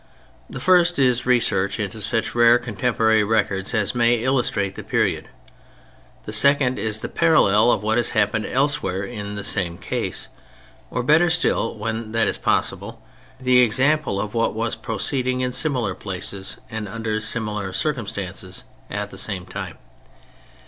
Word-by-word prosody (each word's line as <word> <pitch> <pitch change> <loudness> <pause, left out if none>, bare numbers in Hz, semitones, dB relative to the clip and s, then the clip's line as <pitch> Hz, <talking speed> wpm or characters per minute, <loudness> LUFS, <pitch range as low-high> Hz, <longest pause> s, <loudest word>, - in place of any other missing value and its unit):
The - - -7
first 180 -2 +4
is 125 -2 +2
research 105 -5 +1
into 105 +1 -4
such 110 +2 0
rare 120 0 +6
contemporary 110 -1 +1
records 100 -3 0
as 105 -3 0
may 120 -1 +3
illustrate 120 -5 0
the - - -8
period: - - -1 0.9
the 105 - -7
second 135 +2 +4
is 110 -1 -2
the - - -3
parallel 120 -9 +4
of 95 - 0
what 110 +2 +1
has 120 - +1
happened 110 +1 +1
elsewhere 135 -8 0
in 105 -2 -6
the 105 - -5
same 90 -4 -1
case, 90 - -3 0.6
or 125 - -2
better 160 +6 +4
still 160 -9 +1
(when 110 +1 -4
that 115 - +2
is - - -2
possible) - - -1 0.4
the 125 -1 +4
example 130 0 +2
of 105 +1 -4
what 115 -2 0
was 115 +1 -1
proceeding 125 +3 -2
in 125 0 -1
similar 125 -8 -1
places 95 0 -5
and 110 -1 -4
under 110 0 -3
similar 105 -3 0
circumstances 100 - -4 0.3
at 100 +1 -4
the 95 - -6
same 95 -4 -1
time. 90 - -7
110 Hz, 150 wpm, -22 LUFS, 105-125 Hz, 0.9 s, rare